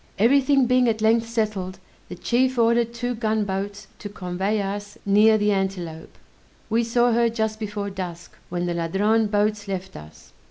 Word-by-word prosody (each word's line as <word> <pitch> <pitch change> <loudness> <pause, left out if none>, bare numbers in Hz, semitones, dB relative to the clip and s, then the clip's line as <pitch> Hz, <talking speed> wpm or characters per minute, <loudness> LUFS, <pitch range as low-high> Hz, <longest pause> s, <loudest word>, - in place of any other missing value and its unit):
Every 250 +7 +4
thing 275 -1 +3
being 250 0 +3
at 220 -1 0
length 225 +1 +3
settled, 210 -5 -2 0.3
the - - -6
chief 255 +1 0
ordered 235 0 +3
two 245 +1 -3
gunboats 205 -3 -2
to 205 - -7
convey 195 +2 -2
us 205 +2 -5
near 210 +2 +5
the 210 0 +1
Antelope; 185 -5 -3 0.5
we 230 +1 +2
saw 240 +1 +2
her 235 0 +3
just 220 -1 -2
before 205 -2 -4
dusk, 180 -2 -7 0.2
when 175 0 -2
the 175 - -1
Ladrone 205 +7 +1
boats 205 0 0
left 190 -1 -5
us. 75 0 -13
210 Hz, 165 wpm, -23 LUFS, 195-230 Hz, 0.5 s, near